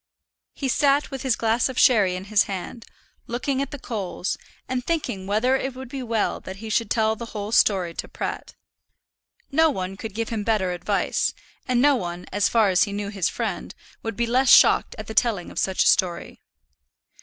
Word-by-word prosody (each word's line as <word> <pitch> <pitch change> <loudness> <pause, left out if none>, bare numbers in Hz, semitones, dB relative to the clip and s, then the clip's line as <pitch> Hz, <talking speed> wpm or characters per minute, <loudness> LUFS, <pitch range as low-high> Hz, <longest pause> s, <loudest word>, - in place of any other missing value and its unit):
He 275 - -3
sat 285 +2 +2
with 270 -2 -5
his 260 -4 +1
glass 225 +4 +1
of 260 - -7
sherry 205 -7 +4
in 185 - -5
his 205 +1 +2
hand, 195 +4 -6 0.4
looking 260 +3 -1
at 275 - -3
the 290 - -7
coals, 200 -8 -3 0.3
and 255 -1 -2
thinking 245 - -2
whether 220 +6 +2
it 265 -1 -3
would 260 -1 -8
not - - -19
be 275 - -4
well 230 -3 -1
that 190 - -8
he 220 +2 -7
should 225 -1 +1
tell 220 -1 +2
the 235 +1 -7
whole 205 +1 -4
story 185 -6 +3
to - - -5
Pratt. - - -5 1.0
No 320 +3 +4
one 190 -7 -3
could 220 -2 -7
give 230 0 -2
him 220 -3 -3
better 205 -4 +1
advice; 175 - -1 0.3
and 250 -2 +2
no 290 -1 +5
one, 175 -5 -5
as 205 +1 +2
far 220 -3 +3
as 180 - +4
he 200 - -6
knew 205 0 -3
his 195 -4 -1
friend, - - -4 0.3
would 225 -2 -4
be 235 - 0
less 250 +3 +2
shocked - - +6
at - - -6
the 220 - -7
telling 220 -6 +1
of - - -4
such 190 -1 +1
a - - +2
story. 175 -2 +1
225 Hz, 205 wpm, -24 LUFS, 195-255 Hz, 1.0 s, shocked